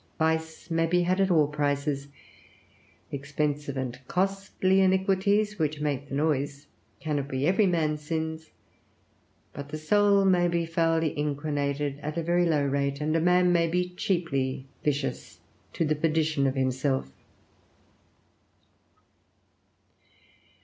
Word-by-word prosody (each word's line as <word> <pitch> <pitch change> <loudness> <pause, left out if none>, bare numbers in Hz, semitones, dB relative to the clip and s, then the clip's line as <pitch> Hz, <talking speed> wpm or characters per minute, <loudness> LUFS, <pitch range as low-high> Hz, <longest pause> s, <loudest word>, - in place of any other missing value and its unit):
Vice 160 +1 -1
may 165 0 +2
be 180 +1 +2
had 185 +2 +1
at 195 - +2
all 160 -4 +4
prices; 145 -1 -1 1.0
expensive 145 0 -2
and 125 -1 -4
costly 195 0 +1
iniquities, 195 +2 +2
which 155 -1 -1
make 145 -2 -2
the 135 - -4
noise, 145 -1 -1 0.3
cannot 145 -3 -2
be 135 0 -2
every 190 +4 +3
man's 155 -4 0
sins; 160 0 -4 1.0
but 140 0 -8
the 155 - -4
soul 200 +5 +3
may 180 -2 +4
be 170 -1 0
foully 165 -1 +1
inquinated 145 -1 -2
at 150 +2 -5
a 165 - -1
very 175 +1 +2
low 150 -3 +2
rate, 140 0 -1
and 155 +1 0
a 165 - +2
man 180 +1 +4
may 170 -1 +3
be 180 +2 0
cheaply 150 -8 -1 0.2
vicious 145 -1 -2 0.3
to 165 - -1
the 155 - +2
perdition 155 -2 +1
of 135 - -1
himself. 130 - 0
155 Hz, 130 wpm, -27 LUFS, 145-175 Hz, 1.0 s, all